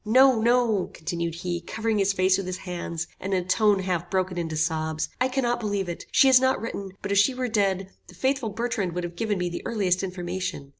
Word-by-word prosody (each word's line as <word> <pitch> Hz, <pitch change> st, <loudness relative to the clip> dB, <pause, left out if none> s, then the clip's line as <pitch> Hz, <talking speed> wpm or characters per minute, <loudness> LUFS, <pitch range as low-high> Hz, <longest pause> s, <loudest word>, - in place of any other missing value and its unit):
No, 255 Hz, +2 st, +5 dB
no," 235 Hz, -4 st, +2 dB
continued 170 Hz, 0 st, -3 dB
he, 175 Hz, 0 st, -3 dB
covering 220 Hz, +4 st, -1 dB
his 195 Hz, 0 st, +3 dB
face 185 Hz, -1 st, +3 dB
with 195 Hz, -1 st, -3 dB
his 185 Hz, 0 st, -3 dB
hands, 175 Hz, -2 st, -4 dB
and 195 Hz, 0 st, -2 dB
in 180 Hz, -, 0 dB
a -, -, -16 dB
tone 205 Hz, +2 st, +3 dB
half 180 Hz, -2 st, -2 dB
broken 185 Hz, -1 st, 0 dB
into 165 Hz, -3 st, -3 dB
sobs, 160 Hz, -1 st, -1 dB
"I 255 Hz, -, +4 dB
cannot 255 Hz, -2 st, 0 dB
believe 205 Hz, -4 st, -2 dB
it. 175 Hz, -, -6 dB
She -, -, +5 dB
has 260 Hz, -1 st, +7 dB
not 260 Hz, 0 st, +2 dB
written, 200 Hz, -4 st, -5 dB
but 200 Hz, -, -3 dB
if 200 Hz, -, +4 dB
she 255 Hz, +6 st, +3 dB
were 255 Hz, 0 st, -1 dB
dead, 195 Hz, -4 st, 0 dB, 0.2 s
the -, -, -14 dB
faithful 265 Hz, -3 st, 0 dB
Bertrand 215 Hz, -4 st, -2 dB
would 180 Hz, +1 st, -3 dB
have 175 Hz, 0 st, -5 dB
given 215 Hz, 0 st, -1 dB
me 180 Hz, -1 st, -1 dB
the 175 Hz, -, -5 dB
earliest 190 Hz, -5 st, +1 dB
information. 180 Hz, -6 st, -4 dB
195 Hz, 230 wpm, -25 LUFS, 175-225 Hz, 0.2 s, has